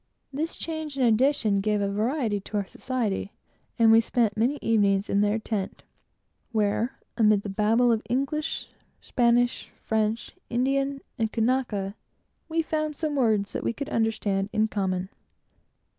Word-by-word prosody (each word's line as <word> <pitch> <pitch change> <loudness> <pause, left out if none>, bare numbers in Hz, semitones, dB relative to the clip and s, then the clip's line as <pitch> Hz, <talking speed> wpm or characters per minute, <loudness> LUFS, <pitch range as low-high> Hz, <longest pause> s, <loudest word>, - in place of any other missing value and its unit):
They 305 +4 -1 0.2
made 315 -3 -4
an 265 - +2
addition 230 -3 +3
to 210 +3 0
our 205 -1 0
society, 215 -3 -3 0.4
and 225 -2 +6
we 225 +1 +7
spent 230 -2 +1
many 245 +7 +1
evenings 200 -2 +2
in 200 - +3
their 210 +1 +2
tent, 215 -3 -4 0.7
where, 220 +2 0 0.2
amid 210 -3 +4
the 205 - -4
Babel 220 +5 +3
of 225 -1 +1
English, 275 +5 -1 0.3
Spanish, 240 0 +1
French, 220 +1 -1 0.2
Indian, 275 +3 0 0.2
and 220 -1 0
Kanaka, 225 -5 0 0.6
we 325 0 +1
found 310 -1 -2
some 305 -2 -2
words 215 -6 +1
that - - -3
we - - 0
could 280 +4 -5
understand 210 -3 0
in 215 0 +2
common. 190 -2 -1
225 Hz, 135 wpm, -26 LUFS, 205-260 Hz, 0.7 s, we